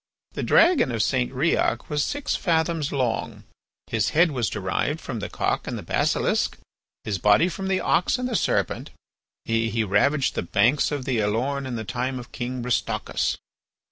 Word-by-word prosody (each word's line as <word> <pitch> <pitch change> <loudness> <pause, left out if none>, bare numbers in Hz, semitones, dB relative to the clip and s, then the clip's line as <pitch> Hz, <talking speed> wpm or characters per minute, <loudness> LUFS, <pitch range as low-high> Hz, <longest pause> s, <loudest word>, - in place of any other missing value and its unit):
The - - -5
dragon 335 - +4
of 115 -3 0
St. 125 -2 0
Riok 140 +6 +1
was 150 -1 0
six 285 0 -2
fathoms 165 -4 0
long; 125 -5 -2 0.4
his 110 -3 0
head 170 -1 +5
was 120 -8 -1
derived - - -2
from - - -5
the - - -5
cock - - -1
and - - -3
the - - -7
basilisk, - - 0 0.5
his 100 -3 -2
body 105 - +4
from 190 +2 -4
the 190 -1 +1
ox 180 - +2
and 250 0 -2
the 245 - -2
serpent; - - 0 0.6
he 115 0 0
ravaged 130 +8 +2
the - - -2
banks 115 - +2
of 145 -3 -3
the 130 -4 0
Elorn 130 +7 -1
in 125 - -4
the 110 - -4
time 130 +3 -2
of 125 -1 -9
King 125 0 -4
Bristocus. 125 -2 -1
130 Hz, 170 wpm, -24 LUFS, 115-160 Hz, 0.6 s, head